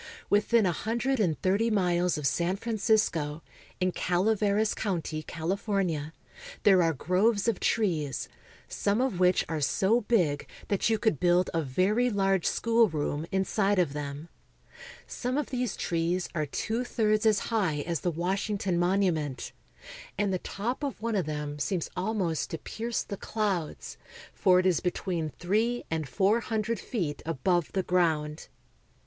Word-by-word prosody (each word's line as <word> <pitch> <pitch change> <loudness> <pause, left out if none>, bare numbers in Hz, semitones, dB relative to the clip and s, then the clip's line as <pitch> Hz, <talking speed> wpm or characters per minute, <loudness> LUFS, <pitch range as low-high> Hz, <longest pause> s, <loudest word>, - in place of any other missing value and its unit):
Within 210 +2 +4
a 180 - +3
hundred 235 +8 -1
and 175 -7 +1
thirty 200 +5 +2
miles 180 -4 +1
of 150 - -4
San 170 +6 +1
Francisco, 200 -8 0 0.4
in 185 0 +1
Calaveras 205 +4 +1
county, 165 -6 -2
California, 170 -2 -2 0.5
there 190 -3 +6
are 165 -1 +3
groves 190 - +1
of 230 -5 +1
trees 160 - 0 0.4
some 205 +2 0
of 250 -8 0
which 180 0 +3
are 160 -2 -3
so 195 - +2
big 180 -11 +1 0.2
that 200 +2 +1
you 220 - +2
could 215 - +1
build 175 +1 +3
a 165 - +1
very 190 - +1
large 195 -4 +1
schoolroom 165 -10 +1
inside 195 +1 +1
of 170 -6 +2
them. 145 +1 -5 0.8
Some 250 +2 -3
of 295 - -2
these 250 -4 -1
trees 170 +2 -1
are 155 -3 -1
two 225 - -2
thirds 215 -2 +1
as 215 -2 +4 0.2
high 180 -10 +1
as 170 +1 -2
the 180 - -1
Washington 190 +2 -1
Monument, 175 -7 0 0.7
and 200 -1 +1
the 185 - 0
top 230 +11 -4
of 280 -6 -3
one 230 0 -2
of 185 -6 0
them 150 -1 -4
seems 175 +3 -2
almost 185 -5 -1
to 165 - -4
pierce 230 +7 -3
the 200 - -6
clouds, 195 -9 -3 0.3
for 185 -2 +4
it 185 - 0
is 180 -4 +3
between 175 -3 -2
three 220 - 0
and 160 -4 -2
four 200 - +2
hundredfeetabove 180 - -1
the 190 - 0
ground. 160 -4 0
185 Hz, 145 wpm, -28 LUFS, 165-215 Hz, 0.8 s, there